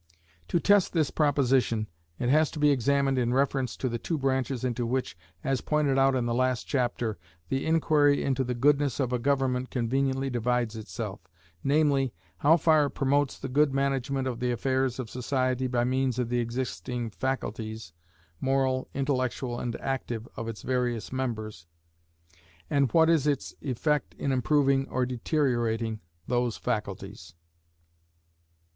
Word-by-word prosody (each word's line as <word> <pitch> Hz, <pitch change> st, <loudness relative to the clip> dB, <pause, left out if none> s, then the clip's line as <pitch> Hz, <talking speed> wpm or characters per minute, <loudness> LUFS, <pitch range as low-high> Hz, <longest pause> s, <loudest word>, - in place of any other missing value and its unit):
To 170 Hz, -, +1 dB
test 205 Hz, +1 st, +3 dB
this 155 Hz, -5 st, +1 dB
proposition, 130 Hz, -, +2 dB, 0.3 s
it 120 Hz, -, -1 dB
has 155 Hz, +2 st, +4 dB
to 155 Hz, -, -7 dB
be 150 Hz, 0 st, +5 dB
examined 140 Hz, +1 st, +2 dB
in 120 Hz, 0 st, +1 dB
reference 135 Hz, -2 st, 0 dB
to 130 Hz, -, -1 dB
the 120 Hz, -1 st, -2 dB
two 165 Hz, -, -2 dB
branches 130 Hz, -2 st, -1 dB
into 125 Hz, -1 st, -1 dB
which, 130 Hz, -3 st, -2 dB, 0.3 s
as 135 Hz, -3 st, 0 dB
pointed 145 Hz, -3 st, +1 dB
out 135 Hz, 0 st, +4 dB
in 125 Hz, -2 st, 0 dB
the 120 Hz, -, 0 dB
last 130 Hz, -1 st, +1 dB
chapter, 120 Hz, -5 st, -1 dB, 0.3 s
the 135 Hz, +2 st, -1 dB
inquiry 150 Hz, -3 st, +3 dB
into 135 Hz, -1 st, +1 dB
the 125 Hz, -1 st, -2 dB
goodness 145 Hz, +1 st, +2 dB
of 125 Hz, -2 st, 0 dB
a 125 Hz, -, +1 dB
government 130 Hz, -1 st, 0 dB
conveniently 135 Hz, +2 st, 0 dB
divides 120 Hz, -1 st, 0 dB
itself, 110 Hz, -1 st, -6 dB, 0.4 s
namely, 140 Hz, -, +2 dB, 0.2 s
how 160 Hz, +4 st, +5 dB
far 155 Hz, -2 st, +4 dB
it -, -, -10 dB
promotes 140 Hz, 0 st, +1 dB
the 135 Hz, -, -5 dB
good 140 Hz, +1 st, +2 dB
management 135 Hz, -1 st, 0 dB
of 120 Hz, -2 st, -3 dB
the 125 Hz, 0 st, 0 dB
affairs 130 Hz, 0 st, 0 dB
of 130 Hz, -3 st, -4 dB
society 130 Hz, +1 st, -1 dB
by 120 Hz, -1 st, +1 dB
means 130 Hz, 0 st, 0 dB
of 125 Hz, -2 st, -1 dB
the 120 Hz, 0 st, +1 dB
existing 120 Hz, -1 st, -3 dB
faculties, 110 Hz, -7 st, -4 dB, 0.5 s
moral, 130 Hz, -1 st, +1 dB
intellectual, 130 Hz, -2 st, -1 dB
and 120 Hz, -1 st, -3 dB
active, 120 Hz, -4 st, -3 dB
of 115 Hz, -, -5 dB
its 115 Hz, -2 st, -6 dB
various 125 Hz, -3 st, -1 dB
members, 110 Hz, -9 st, -4 dB, 1.0 s
and 140 Hz, -4 st, +2 dB
what 160 Hz, -1 st, +5 dB
is 160 Hz, -3 st, +3 dB
its 140 Hz, -2 st, -1 dB
effect 150 Hz, +2 st, -1 dB
in 140 Hz, -, -2 dB
improving 135 Hz, +1 st, +2 dB
or 130 Hz, 0 st, 0 dB
deteriorating 120 Hz, -4 st, 0 dB, 0.3 s
those 120 Hz, -2 st, 0 dB
faculties. 100 Hz, -6 st, -4 dB
130 Hz, 150 wpm, -28 LUFS, 120-140 Hz, 1.0 s, be